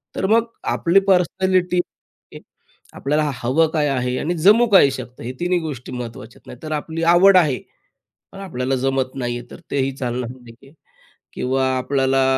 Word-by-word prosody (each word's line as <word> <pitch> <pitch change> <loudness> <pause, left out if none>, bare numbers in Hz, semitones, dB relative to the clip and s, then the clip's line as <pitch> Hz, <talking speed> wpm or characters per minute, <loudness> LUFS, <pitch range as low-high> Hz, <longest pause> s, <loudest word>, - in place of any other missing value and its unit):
तर - - -2
मग 230 +2 +3 0.3
आपली 180 +3 +3
पर्सनॅलिटी 185 0 +2 1.2
आपल्याला 150 +1 0
हवं 130 +7 +1
काय 150 -2 +1
आहे 125 -1 -1
आणि 170 +3 -1
जमू 210 +8 +5
काय 190 -9 +6
शकतं? 125 -1 -8
हे 125 - -4
तिन्ही 180 +1 +1
गोष्टी 140 -7 -7
महत्त्वाच्या 120 -2 -8
आहेत. - - -29
नाही 125 - -11
तर 155 - -6
आपली 160 +2 -4
आवड 190 +1 +6
आहे 150 -7 +3 0.8
पण 195 - -11
आपल्याला 135 -8 -3
जमत 135 0 -1
नाही 120 -2 -3
आहे, 120 - -11
तर - - -11
तेही 135 -1 0
चालणार 125 -2 -3
नाही 120 -2 -13
आहे 135 - -18 0.6
किंवा 130 +1 -1
आपल्याला 135 0 +1
135 Hz, 165 wpm, -20 LUFS, 125-175 Hz, 1.2 s, काय